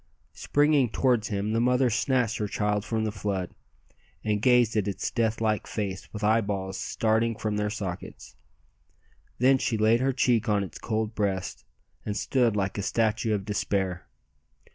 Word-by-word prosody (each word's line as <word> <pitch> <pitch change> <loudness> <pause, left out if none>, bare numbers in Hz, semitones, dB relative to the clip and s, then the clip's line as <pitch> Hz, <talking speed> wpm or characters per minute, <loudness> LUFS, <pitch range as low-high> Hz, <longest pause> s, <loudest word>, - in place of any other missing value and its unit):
Springing 145 -3 +2
towards 120 -2 +1
him, 105 +1 -2
the 115 - +2
mother 125 0 +3
snatched 120 -1 +1
her 105 - -1
child 105 0 -1
from 110 0 -2
the 110 - -1
flood, 100 -3 -3 0.7
and 105 -1 0
gazed 120 -2 +4
at 105 -2 +1
its 100 - -3
death 115 -1 0
like 110 -2 0
face 100 -3 -4
with 105 -1 -7
eyeballs 100 -3 0
starting 115 +2 0
from 110 -1 -2
their 105 0 0
sockets. 95 -4 -6 1.0
Then 130 +2 +4
she 115 - 0
laid 110 +2 +4
her 135 +2 +2
cheek 120 -3 +1
on 105 -1 +2
its 95 - -8
cold 110 -1 -2
breast, 100 -3 -2 0.4
and 105 0 -3
stood 120 -5 +1
like 100 0 -1
a - - 0
statue 110 +1 +1
of 100 -2 -4
despair. 95 -3 -2
110 Hz, 165 wpm, -27 LUFS, 100-115 Hz, 1.0 s, gazed